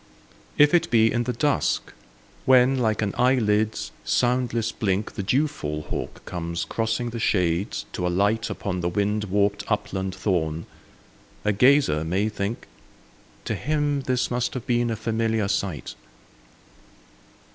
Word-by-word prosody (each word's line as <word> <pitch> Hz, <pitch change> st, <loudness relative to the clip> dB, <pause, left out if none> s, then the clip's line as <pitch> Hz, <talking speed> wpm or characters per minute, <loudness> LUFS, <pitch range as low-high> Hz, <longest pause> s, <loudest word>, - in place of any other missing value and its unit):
If 150 Hz, +2 st, +6 dB
it 170 Hz, -1 st, +3 dB
be 115 Hz, -1 st, +4 dB
in 120 Hz, 0 st, 0 dB
the 125 Hz, -, -1 dB
dusk 145 Hz, +4 st, 0 dB, 0.5 s
when, 130 Hz, 0 st, +5 dB
like 110 Hz, -2 st, +1 dB
an 100 Hz, -, -1 dB
eyelid's 110 Hz, -4 st, +2 dB
soundless 120 Hz, -2 st, +1 dB
blink, 100 Hz, -1 st, -1 dB
The -, -, -4 dB
dewfall 100 Hz, -, -1 dB
hawk -, -, -5 dB
comes 85 Hz, -1 st, -3 dB
crossing 115 Hz, +1 st, -2 dB
the 115 Hz, -, -5 dB
shades 90 Hz, -3 st, 0 dB
to 90 Hz, -, -1 dB
alight 100 Hz, +6 st, +1 dB
Upon 95 Hz, -2 st, -3 dB
the 85 Hz, -, 0 dB
wind 105 Hz, +3 st, 0 dB
warped 100 Hz, +1 st, +1 dB
upland 95 Hz, -2 st, -2 dB
thorn, 85 Hz, -5 st, -1 dB, 0.8 s
a 105 Hz, -, +3 dB
gazer 125 Hz, -, +4 dB
may 95 Hz, +6 st, 0 dB
think, 105 Hz, +2 st, -4 dB, 0.8 s
"To -, -, -1 dB
him 145 Hz, 0 st, 0 dB
this 125 Hz, -1 st, 0 dB
must 125 Hz, +1 st, -1 dB
have 125 Hz, -, -5 dB
been 120 Hz, -1 st, +1 dB
a 115 Hz, -, -1 dB
familiar 110 Hz, -1 st, 0 dB
sight." 100 Hz, -6 st, -2 dB
110 Hz, 135 wpm, -24 LUFS, 95-125 Hz, 0.8 s, If